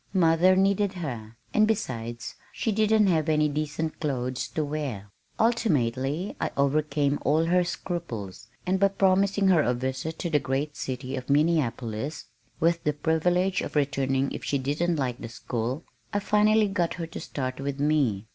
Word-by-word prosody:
Mother 175 Hz, +1 st, +5 dB
needed 195 Hz, +1 st, +2 dB
her, 120 Hz, -, -6 dB, 0.2 s
and 215 Hz, 0 st, +4 dB
besides 120 Hz, -, -3 dB, 0.2 s
she 225 Hz, -, -1 dB
didn't 215 Hz, 0 st, +3 dB
have 160 Hz, -4 st, +2 dB
any 150 Hz, -1 st, +3 dB
decent 155 Hz, +2 st, -3 dB
clothes 130 Hz, -3 st, -2 dB
to 155 Hz, +5 st, -2 dB
wear. 135 Hz, -10 st, -4 dB, 0.3 s
Ultimately 155 Hz, -, +1 dB
I -, -, 0 dB
overcame 145 Hz, 0 st, +1 dB
all 155 Hz, +3 st, +2 dB
her 180 Hz, +2 st, +3 dB
scruples, 125 Hz, -, -5 dB, 0.2 s
and 185 Hz, +1 st, +1 dB
by 200 Hz, -, +5 dB
promising 195 Hz, 0 st, +2 dB
her 175 Hz, -4 st, +5 dB
a 125 Hz, -3 st, +1 dB
visit 130 Hz, +6 st, -3 dB
to 170 Hz, -, -3 dB
the 150 Hz, -, +4 dB
great 140 Hz, +3 st, -2 dB
city 130 Hz, +1 st, -4 dB
of 130 Hz, 0 st, -6 dB
Minneapolis 140 Hz, -4 st, 0 dB, 0.3 s
(with 170 Hz, +1 st, +2 dB
the 150 Hz, -, +1 dB
privilege 175 Hz, +5 st, +1 dB
of -, -, -6 dB
returning 135 Hz, -2 st, +1 dB
if -, -, -6 dB
she 140 Hz, -, 0 dB
didn't 150 Hz, +6 st, 0 dB
like 130 Hz, -5 st, -2 dB
the 115 Hz, -, -6 dB
school) 120 Hz, +5 st, -3 dB, 0.3 s
I 205 Hz, -, 0 dB
finally 210 Hz, +1 st, +3 dB
got 180 Hz, -4 st, -1 dB
her 170 Hz, -, -4 dB
to 165 Hz, -, -8 dB
start 130 Hz, -2 st, -4 dB
with 140 Hz, 0 st, -3 dB
me. 140 Hz, -9 st, +1 dB
150 Hz, 165 wpm, -26 LUFS, 130-180 Hz, 0.3 s, Mother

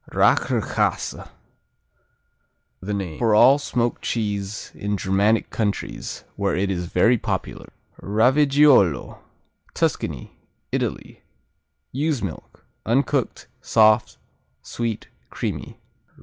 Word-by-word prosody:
Rächerkäse -, -, 0 dB, 1.5 s
The 100 Hz, +2 st, -4 dB
name 90 Hz, -6 st, -5 dB
for 115 Hz, -3 st, +3 dB
all 135 Hz, +6 st, +6 dB
smoked 120 Hz, -4 st, -2 dB
cheese 105 Hz, -2 st, -3 dB
in 105 Hz, 0 st, -3 dB
Germanic 100 Hz, +4 st, +1 dB
countries, 105 Hz, -3 st, -3 dB
where -, -, -1 dB
it 95 Hz, +1 st, 0 dB
is 90 Hz, -2 st, -3 dB
very 115 Hz, +8 st, +3 dB
popular. -, -, -4 dB, 0.3 s
Raviggiolo 130 Hz, -, +3 dB, 0.6 s
Tuscany, -, -, -2 dB, 0.4 s
Italy -, -, -4 dB, 0.7 s
Ewe's 145 Hz, -2 st, -1 dB
milk. 90 Hz, -6 st, -8 dB, 0.2 s
Uncooked; 135 Hz, +2 st, 0 dB, 0.2 s
soft; 110 Hz, 0 st, +3 dB, 0.5 s
sweet; 115 Hz, -2 st, -4 dB, 0.2 s
creamy. -, -, -5 dB
110 Hz, 90 wpm, -22 LUFS, 100-125 Hz, 1.5 s, all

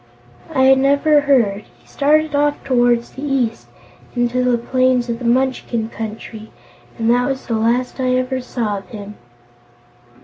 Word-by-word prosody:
"I 265 Hz, 0 st, +6 dB
never 280 Hz, +3 st, +3 dB
heard. 230 Hz, -8 st, +1 dB
He -, -, -28 dB
started 305 Hz, +2 st, +1 dB
off 290 Hz, 0 st, 0 dB
toward 240 Hz, -2 st, +2 dB
the 265 Hz, -, -12 dB
east, 265 Hz, -6 st, -1 dB, 0.5 s
into 245 Hz, +1 st, 0 dB
the 250 Hz, -1 st, +2 dB
plains 255 Hz, 0 st, +1 dB
of 230 Hz, 0 st, -3 dB
the 245 Hz, -, -6 dB
Munchkin 240 Hz, -2 st, 0 dB
Country, 220 Hz, 0 st, -8 dB, 0.5 s
and 225 Hz, -2 st, -1 dB
that 245 Hz, +1 st, +2 dB
was 265 Hz, -1 st, -4 dB
the 235 Hz, -, -3 dB
last 235 Hz, +4 st, 0 dB
I 255 Hz, -1 st, +1 dB
ever 255 Hz, 0 st, -1 dB
saw 225 Hz, -5 st, -3 dB
of 195 Hz, -, -17 dB
him." 205 Hz, -2 st, -8 dB
250 Hz, 150 wpm, -18 LUFS, 230-265 Hz, 0.5 s, I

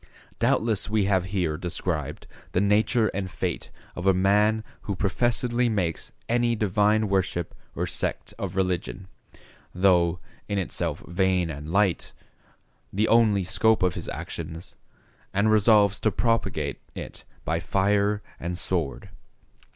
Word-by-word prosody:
Doubtless 110 Hz, -3 st, +1 dB
we 105 Hz, -2 st, +2 dB
have 95 Hz, -2 st, +2 dB
here 90 Hz, -5 st, -1 dB
described 85 Hz, 0 st, -3 dB, 0.3 s
the -, -, +2 dB
nature 105 Hz, +3 st, +3 dB
and 95 Hz, -1 st, -3 dB
fate -, -, -3 dB, 0.3 s
of 85 Hz, +2 st, -3 dB
a 95 Hz, -, +5 dB
man 105 Hz, +3 st, +3 dB, 0.2 s
who 100 Hz, -, -3 dB
professedly 120 Hz, +5 st, +1 dB
makes 90 Hz, -7 st, -2 dB, 0.2 s
any 120 Hz, 0 st, +2 dB
divine 105 Hz, +1 st, +2 dB
worship 95 Hz, -3 st, -1 dB, 0.2 s
or -, -, -1 dB
sect -, -, -3 dB
of 95 Hz, -2 st, -4 dB
religion, 95 Hz, 0 st, -2 dB, 0.7 s
though, 90 Hz, -2 st, +3 dB, 0.3 s
in 100 Hz, -, -1 dB
itself 85 Hz, -4 st, -3 dB
vain 90 Hz, -1 st, +1 dB
and 75 Hz, +1 st, -7 dB
light, 100 Hz, -2 st, +1 dB, 0.8 s
the 105 Hz, +3 st, +1 dB
only 110 Hz, -4 st, +4 dB
scope 110 Hz, +3 st, +2 dB
of 90 Hz, -2 st, +2 dB
his -, -, -5 dB
actions, 80 Hz, +1 st, -7 dB, 0.6 s
and 105 Hz, +2 st, +3 dB
resolves 105 Hz, -1 st, +4 dB
to 110 Hz, -, +2 dB
propagate 115 Hz, +2 st, -1 dB, 0.2 s
it -, -, -8 dB, 0.2 s
by -, -, 0 dB
fire 100 Hz, +1 st, +1 dB, 0.2 s
and 85 Hz, +1 st, -3 dB
sword. 85 Hz, -7 st, -2 dB
100 Hz, 130 wpm, -26 LUFS, 90-110 Hz, 0.8 s, a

